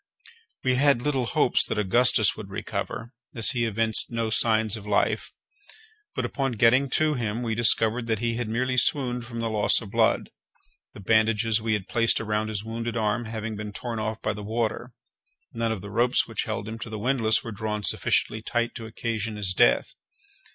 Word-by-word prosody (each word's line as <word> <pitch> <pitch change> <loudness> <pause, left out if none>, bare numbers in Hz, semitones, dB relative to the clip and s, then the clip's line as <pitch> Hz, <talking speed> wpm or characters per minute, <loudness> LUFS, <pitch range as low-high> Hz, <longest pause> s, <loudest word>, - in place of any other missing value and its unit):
We 130 -1 +2
had 140 -3 +3
little 135 -5 0
hopes - - +3
that - - -2
Augustus 110 +1 +4
would 105 -3 -9
recover, 115 +4 -5 0.2
as 115 -3 +4
he 120 -3 0
evinced 110 0 -1
no 115 -1 -2
signs 110 -1 +1
of 105 -2 -9
life; 105 0 +1 0.9
but, - - -1
upon 135 -2 -2
getting 120 +5 +4
to 155 -1 +2
him, 115 -2 -2
we 115 -2 -1
discovered 115 +1 +3
that 110 -1 0
he 115 +2 -1
had 120 -1 -3
merely 125 +3 -1
swooned 125 -3 0
from 115 0 -5
the 115 - -1
loss 105 -1 +3
of 100 -3 -10
blood, - - +1 0.6
the - - -11
bandages 110 +2 +2
we 110 0 0
had 105 -2 -2
placed 115 -1 +2
around 110 -1 -1
his 105 -2 -4
wounded 115 +1 -4
arm 110 +2 0
having 110 0 -5
been 105 0 -6
torn 115 +1 -5
off 110 +1 -3
by 110 - 0
the 105 - -8
water; 115 +3 -2 0.6
none 115 -1 -1
of 110 -4 -3
the 100 +1 -9
ropes 120 +3 +2
which - - -3
held 100 - -4
him 110 +1 -6
to 115 - -6
the 110 - -5
windlass 115 -1 +1
were 115 - -6
drawn 105 0 -4
sufficiently 110 +2 0
tight 120 +1 -1
to 115 -2 -7
occasion 110 -1 -3
his 100 -3 -1
death. - - +3
115 Hz, 195 wpm, -26 LUFS, 110-120 Hz, 0.9 s, Augustus